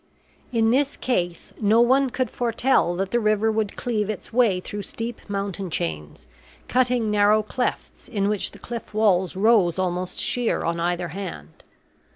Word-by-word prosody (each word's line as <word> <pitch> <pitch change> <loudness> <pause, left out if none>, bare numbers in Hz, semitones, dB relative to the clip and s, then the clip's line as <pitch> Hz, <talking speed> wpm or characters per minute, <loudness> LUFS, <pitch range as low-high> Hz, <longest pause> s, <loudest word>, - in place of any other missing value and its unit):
In 225 -2 +2
this 280 +3 +1
case 175 -9 -2
no 215 +2 +4
one 260 +3 +4
could 255 +1 -2
foretell 235 -6 +1
that 195 +1 -2
the 240 - +2
river 215 0 +2
would 215 -2 -1
cleave 215 -4 -1
its 215 +1 -6
way 225 -7 +3
through 205 +3 -6
steep 230 +3 -5
mountain 195 -1 -3
chains, 75 - -4 0.4
cutting 245 -3 +2
narrow 210 +1 +4
clefts 245 +4 -4
in 200 -5 0
which 210 -1 -1
the - - -14
cliff 235 -3 -7
walls 190 -5 +2
rose 195 -4 +3
almost 180 0 -2
sheer 245 -2 0
on 170 0 -1
either 175 0 -1
hand. 150 - -8
210 Hz, 160 wpm, -24 LUFS, 185-235 Hz, 0.4 s, no